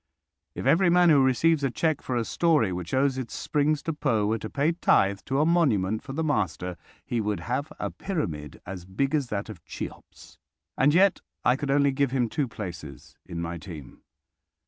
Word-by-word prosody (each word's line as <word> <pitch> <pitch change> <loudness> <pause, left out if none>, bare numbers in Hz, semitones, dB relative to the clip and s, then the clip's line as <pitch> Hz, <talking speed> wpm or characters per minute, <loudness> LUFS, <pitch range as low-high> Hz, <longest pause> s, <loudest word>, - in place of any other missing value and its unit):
If - - -5
every 175 +2 +4
man 175 -1 +5
who 140 -3 +6
receives 145 +4 +3
a 135 - +2
cheque 155 +4 0
for 130 - -3
a 115 -1 0
story 150 - +2
which 90 -1 -5
owes 130 0 +2
its 125 - -6
springs 150 0 0
to 165 - -2
Poe 120 -9 +1
were 110 +2 0
to 110 - -6
pay 145 +3 +1
tithe 100 - +2
to 135 +1 0
a 150 - +4
monument 110 - +2
for 135 - -8
the 160 +3 -1
master, 95 - -1 0.3
he 120 -2 -1
would 105 -4 -2
have 140 +8 -3
a - - -2
pyramid 80 - -4
as 90 -1 -7
big 135 +10 -1
as 145 -4 +1
that 100 -2 -3
of 105 -7 -10
Cheops. - - -9 0.4
And 145 +3 +3
yet 195 +1 +4 0.2
I 125 - +5
could 140 +1 -4
only 140 0 +3
give 140 0 +1
him 125 -3 0
two 145 +2 -1
places 90 -10 -8
in 85 0 -4
my 85 0 -4
team. 80 -7 -10
130 Hz, 200 wpm, -26 LUFS, 100-150 Hz, 0.4 s, who